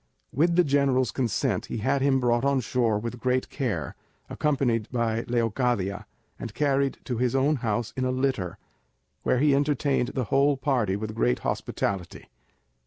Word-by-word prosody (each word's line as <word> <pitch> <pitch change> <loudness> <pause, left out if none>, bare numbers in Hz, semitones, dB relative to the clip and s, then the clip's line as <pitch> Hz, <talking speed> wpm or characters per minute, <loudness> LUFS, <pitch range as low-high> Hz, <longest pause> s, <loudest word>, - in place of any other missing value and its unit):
With 170 +5 +2
the 180 - +5
general's 140 -3 +2
consent 125 -6 -1
he - - -4
had 135 +5 0
him 135 -1 +3
brought 120 -1 +1
on 140 -1 +2
shore 115 -3 +1
with 115 +3 -5
great 125 +1 0
care, 100 - -2 0.4
accompanied 130 -7 0
by 115 -2 -1
Leocadia, 115 -4 0 0.3
and 115 -3 -7
carried 140 -2 +1
to 125 -3 -3
his 125 0 +1
own 140 +3 +2
house 115 -1 -2
in 130 - -2
a 130 - +1
litter, 130 -10 -1 0.6
where - - +1
he 145 +2 +4
entertained 140 -2 +1
the 130 - 0
whole 140 +1 +4
party 130 -8 0
with 110 +1 -4
great - - +1
hospitality. 95 -4 -3
125 Hz, 160 wpm, -26 LUFS, 115-140 Hz, 0.6 s, the